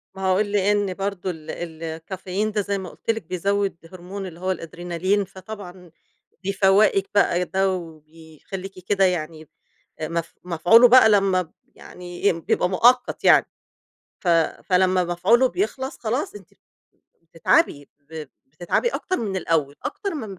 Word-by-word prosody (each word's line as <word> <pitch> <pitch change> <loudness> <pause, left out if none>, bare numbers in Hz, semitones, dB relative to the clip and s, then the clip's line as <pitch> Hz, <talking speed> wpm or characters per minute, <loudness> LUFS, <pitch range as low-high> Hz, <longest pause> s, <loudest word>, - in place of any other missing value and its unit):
ما 190 - -8
هو 185 0 +3
لأن 205 -1 +1
برضه 195 -1 -3
ال 160 -2 -8
ال 165 -1 -7
الكافيين 185 +5 -4
ده 210 0 0
زي 200 0 -2
ما 190 -2 -6
قُلت - - -14
لِك 225 -2 -5
بيزوّد 195 +3 -1 0.2
هرمون 185 +2 -7
اللي 170 -2 -11
هو 185 +1 -1
الأدرينالين، 175 +3 -2
فطبعًا 190 -2 -11 0.5
بيفوّقِك 195 0 +3
بقى، 180 -3 +3
ده 190 +1 +1
وبيخلّيكِ 165 +2 -9
كده 195 -1 +3
يعني 160 -3 -3 0.5
مف 165 +1 -3
مفعولُه 180 +8 +6
بقى 255 -1 +7
لما 195 -3 +3
ب 165 - -17 0.2
يعني 180 +2 -3
بيبقى 170 - 0
مؤقت 245 +7 +3
يعني، - - +6 0.7
ف 180 - -3 0.4
فلمّا 185 0 +2
مفعوله 195 +9 +3
بيخلَص 270 -6 -3
خلاص 260 - -2
أنتِ 415 - -13 0.7
بتتعبي، 160 -3 +1
ب 155 +2 -8 0.2
بتتعبي 170 - -1
أكتر 375 -5 -2
من 200 -4 -3
الأول، 160 -5 0
أكتر 400 -4 -4
من 215 - -6
185 Hz, 140 wpm, -23 LUFS, 170-205 Hz, 0.7 s, بقى